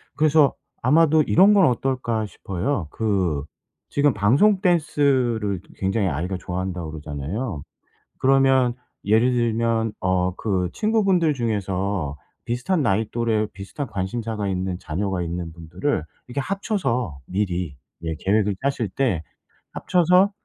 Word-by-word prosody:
그래서 150 -2 +4 0.3
아마도 155 +4 +4
'이런 195 +8 +5
건 195 -3 +6
어떨까?' 125 -3 0
싶어요. 95 - -3
그 95 -10 0 0.5
지금 145 -1 +2
방송 140 - +3
댄스를 130 - +1 0.2
굉장히 95 +1 0
아이가 90 +4 -2
좋아한다고 90 -3 -4
그러잖아요. 75 - -4 0.6
그러면 135 -2 +4 0.3
예를 110 +5 +3
들면 115 -2 +1
어 90 0 +1
그 95 -4 -1
친구분들 195 -7 +2
중에서 100 - -2 0.3
비슷한 125 +8 0
나이 105 -1 +1
또래 115 -2 0
비슷한 105 +8 -6
관심사가 105 +2 -3
있는 95 -1 -2
자녀가 90 +2 -2
있는 85 0 -4
분들을 85 - -2 0.3
이렇게 130 +3 -2
합쳐서 135 - -2
미리 90 -6 -2 0.3
예 80 -1 -2
계획을 105 0 +1
짜실 135 -5 0
때 95 - 0 0.5
합쳐서 180 +3 +3
110 Hz, 285 characters per minute, -23 LUFS, 95-135 Hz, 0.6 s, 건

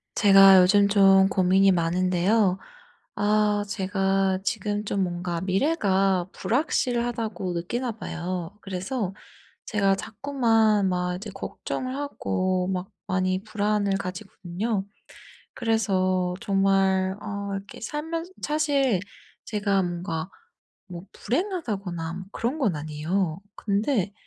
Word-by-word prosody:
제가 195 -1 +8
요즘 200 +2 +5
좀 195 -1 +6
고민이 190 +1 +4
많은데요. 185 +3 +2 0.6
아 210 0 +2
제가 195 -1 0
지금 205 0 -2
좀 200 -1 0
뭔가 175 -1 -3
'미래가 195 - +1
불확실하다.'고 235 - -1
느끼나 235 +9 -2
봐요. 180 -3 -5
그래서 195 +2 -3 0.5
제가 195 -2 +2
자꾸만 225 -3 +1
막 180 -1 -1
이제 200 +4 -8
걱정을 255 +5 -5
하고 185 -10 -1
막 185 +1 -3 0.2
많이 185 0 0
불안을 210 -2 0
가지거든요. 195 +2 -4 0.7
그래서 185 -6 0
정말 195 -1 +2
어 200 -1 -5
이렇게 195 0 -8
살면 320 +7 -4 0.2
사실 285 -8 +1 0.5
제가 200 -2 0
뭔가 175 -1 -4 0.6
뭐 175 0 -8
불행하다거나 210 - -3
뭐 185 +1 -7
그런 255 +7 -2
건 210 - +1
아니에요. 155 +4 -2 0.2
근데 205 -1 0
195 Hz, 235 characters per minute, -25 LUFS, 185-215 Hz, 0.7 s, 제가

